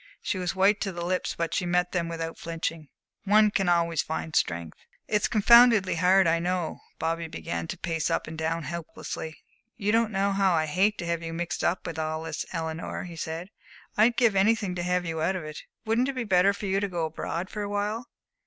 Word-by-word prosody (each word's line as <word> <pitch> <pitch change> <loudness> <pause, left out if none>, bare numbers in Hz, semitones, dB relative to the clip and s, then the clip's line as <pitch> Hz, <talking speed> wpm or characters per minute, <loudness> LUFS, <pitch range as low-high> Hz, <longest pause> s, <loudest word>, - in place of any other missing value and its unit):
She 190 - -1
was 180 0 -2
white 195 +2 +3
to 195 - -1
the 170 -1 -5
lips, 180 +1 -1
but 165 -1 -2
she - - 0
met 180 0 +1
them 170 -2 -1
without 165 0 -5
flinching. 165 -2 -4 0.4
"One 210 +1 +5
can 195 -3 +1
always 170 -1 +2
find 160 0 -4
strength." 85 -2 -1 0.3
"It's 210 0 +2
confoundedly 230 -2 +6
hard, 185 +3 +4
I 165 0 +3
know." 175 -1 -2 0.2
Bobby 165 +1 -2
began 85 - -4
to - - -5
pace 165 -2 -1
up - - 0
and 160 - -7
down 160 +1 -2
helplessly. 160 0 -6 0.4
"You 210 -2 0
don't 225 0 +2
know 200 0 +1
how 195 -2 +3
I 160 -1 +2
hate 190 +7 +2
to 175 - -4
have 170 0 -1
you 165 0 -5
mixed 170 +1 -3
up 175 +1 0
in 160 -1 -5
all 155 0 -2
this, 160 -1 -4
Eleanor," 160 -1 -4
he 175 -2 -8
said. 165 +3 -5 0.5
"I'd 225 +2 +4
give 235 -5 +4
anything 200 -1 +2
to 175 - -3
have 180 0 0
you 160 -1 -3
out 180 +4 +1
of 180 - -4
it. 155 0 -7 0.2
Wouldn't 230 +4 +2
it - - -2
be 255 -2 -2
better 190 -2 +4
for 200 +1 -6
you 195 0 +1
to 200 - -1
go 175 -3 -2
abroad 165 +3 -4
for 210 - -4
awhile?" 205 +3 -2
175 Hz, 220 wpm, -27 LUFS, 165-200 Hz, 0.5 s, confoundedly